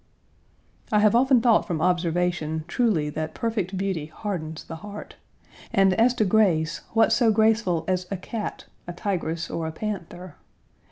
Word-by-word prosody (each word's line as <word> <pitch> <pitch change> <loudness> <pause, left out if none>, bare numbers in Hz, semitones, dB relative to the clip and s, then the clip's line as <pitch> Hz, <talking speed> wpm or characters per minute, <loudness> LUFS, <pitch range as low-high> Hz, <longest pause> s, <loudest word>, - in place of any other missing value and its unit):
I 210 - +3
have 210 0 +4
often 250 +1 +4
thought 230 -2 +3
from 170 -5 -2
observation 175 -2 0
truly 170 -9 +1
that 155 +1 -4
perfect 205 -6 -2
beauty 185 -6 -2
hardens 160 -3 -5
the 165 - -8
heart, 205 +4 -9 0.6
and 195 -1 +4
as 235 +5 +3
to 220 - +2
grace, 175 -6 +2
what 225 0 +4
so 235 -3 +4
graceful 215 -6 +2
as 185 -1 -1
a 195 - -3
cat, 215 +4 -6 0.2
a 175 - -5
tigress, 170 -3 -3
or 165 -1 -3
a - - -4
panther. 185 -2 -6
185 Hz, 155 wpm, -25 LUFS, 165-215 Hz, 0.6 s, have